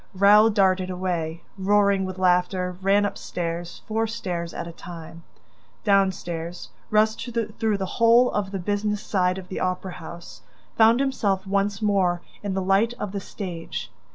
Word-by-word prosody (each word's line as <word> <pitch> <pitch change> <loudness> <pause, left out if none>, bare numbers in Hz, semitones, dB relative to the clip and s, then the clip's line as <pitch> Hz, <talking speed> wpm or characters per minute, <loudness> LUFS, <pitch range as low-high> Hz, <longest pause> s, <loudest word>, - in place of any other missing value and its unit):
Raoul 205 +3 +6
darted 190 -3 +2
away, 175 -3 -3 0.2
roaring 200 0 +3
with 185 0 -6
anger, 180 0 +1
ran 200 +2 +3
up 200 - -3
stairs, 170 0 -5
four 225 +1 0
stairs 175 -6 -4
at - - -5
a - - -6
time, 165 -1 -10 0.6
down 195 -2 +4
stairs, 170 -1 -6 0.2
rushed 220 +3 +2 0.3
through 220 -3 +1
the 190 - -2 0.2
whole 235 +2 +6
of 205 -2 -1
the 195 - -4
business 205 +2 -1
side 185 -2 +1
of 185 -1 -8
the - - -4
opera 185 0 -2
house, 170 -9 -10 0.3
found 225 +2 +5
himself 205 -8 0
once 200 +1 0
more 185 -4 +2 0.2
in 200 -2 -3
the 190 - -1
light 200 +5 +2
of 210 - -4
the 200 -1 -4
stage. 180 -5 -6
190 Hz, 160 wpm, -24 LUFS, 180-205 Hz, 0.6 s, Raoul